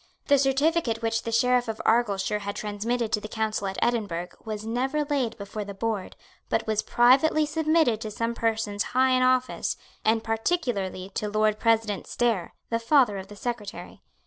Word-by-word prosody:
The 285 -1 +6
certificate 270 -3 +1
which 225 0 0
the 230 - -4
Sheriff 245 +1 +3
of 220 -1 -4
Argyleshire 210 -3 +2
had 200 0 -5
transmitted 220 +2 -2
to 210 - +1
the 215 - -6
Council 215 -2 -2
at 190 - -4
Edinburgh, 200 -8 -1
was 215 -1 -5
never 265 +6 0
laid 275 -6 -1
before 210 0 -5
the 200 -1 -8
board, 215 -2 -3 0.3
but - - 0
was 215 -1 0
privately 270 +6 +4
submitted 310 -6 +2
to 220 - -4
some 230 +2 -2
persons 220 -3 -1 0.2
high 260 0 +5
in 255 0 +3
office, 255 0 +1 0.3
and 220 0 +2
particularly 225 - -1
to 210 - -2
Lord 215 0 +1
President 225 -3 +1
Stair, 230 -7 -1 0.2
the 230 - +1
father 230 -4 +3
of 190 - -8
the 205 - -11
Secretary. 215 -2 -6
225 Hz, 170 wpm, -26 LUFS, 210-250 Hz, 0.3 s, The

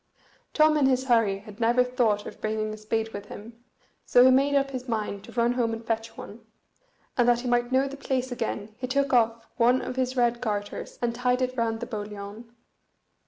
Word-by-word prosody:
Tom 310 0 +5
in 280 -3 +4
his 260 -1 +2
hurry 230 -6 +2
had 205 +1 -13
never 240 +2 +4
thought 235 -5 0
of - - -10
bringing 215 0 -2
a - - -7
spade 220 +1 -2
with 205 0 -7
him, 230 +4 -11 0.4
so 245 0 +5
he 260 - +7
made 275 +2 +3
up 275 0 +2
his 255 -1 -6
mind 210 -3 -3
to - - -12
run 240 0 +2
home 235 -2 0
and 225 0 -7
fetch 225 0 -3
one; 225 +3 -10 0.8
and 245 0 +5
that 240 0 +3
he 255 - -5
might 240 0 +1
know 265 +1 +3
the 275 - -7
place 260 -2 -2
again 220 -3 -4
he 255 - -3
took 275 +1 0
off 230 -1 +2
one 245 +1 +4
of 255 - -5
his 255 0 -1
red 240 -1 +2
garters, 205 -3 -4
and 235 -1 +1
tied 250 +1 +1
it 255 0 -2
round 225 -2 -1
the - - -2
boliaun. 210 0 -7
235 Hz, 215 wpm, -26 LUFS, 220-255 Hz, 0.8 s, he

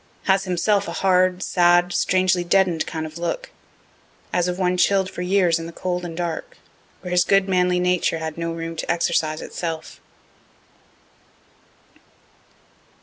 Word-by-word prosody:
Has 190 0 +2
himself 195 +3 +1
a - - -4
hard, 185 0 +2
sad, 175 0 +3
strangely 185 -1 +2
deaden'd 175 -2 +2
kind 160 -1 -4
of 155 +1 -9
look, 175 - -4 0.8
as 180 0 +1
of 180 0 -2
one 180 -1 +1
chill' 195 +2 +3
d 190 - -9
for - - -6
years 180 -2 +2
in 165 - -6
the - - -8
cold 180 +1 -3
and 165 -2 -7
dark, 170 -2 -4 0.4
where 180 - -7
his 180 0 +4
good 195 0 +3
manly 180 -1 +2
nature 180 -2 +1
had 160 -1 -5
no 165 0 -3
room 165 0 -5
to - - -2
exercise 165 -2 0
itself. 165 -2 -6
180 Hz, 150 wpm, -22 LUFS, 165-185 Hz, 0.8 s, his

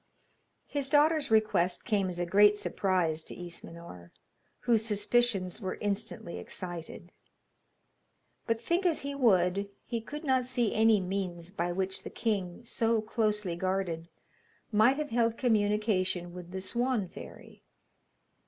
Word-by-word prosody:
His 280 -2 -2
daughter's 300 +1 +4
request 210 -5 +2
came 200 -5 +1
as 175 - -5
a 175 - -1
great 205 +4 +5
surprise 175 -7 0
to - - -6
Ismenor, 170 - -9 0.5
whose 230 -3 +3
suspicions 210 -2 +1
were 185 -2 -3
instantly 200 -4 -3
excited; 175 -1 -7 1.4
but, 230 -1 +1
think 340 +11 0
as 345 -4 +1
he 280 0 -4
would, 200 -6 +2 0.2
he 235 -2 -3
could 295 +7 -7
not 260 -3 +2
see 245 -3 0
any 220 -1 +5
means 180 -2 -4
by 175 -2 -2
which 190 +1 -2
the - - -7
king, 205 -2 -2
so 230 0 +1
closely 210 -4 0
guarded, 175 -2 -2 0.6
might 225 +5 +5
have 300 -4 -3
held 230 -1 +2
communication 205 -6 +1
with 175 -1 -9
the 190 +1 -5
Swan 235 +1 0
fairy. - - -12
205 Hz, 135 wpm, -30 LUFS, 180-230 Hz, 1.4 s, great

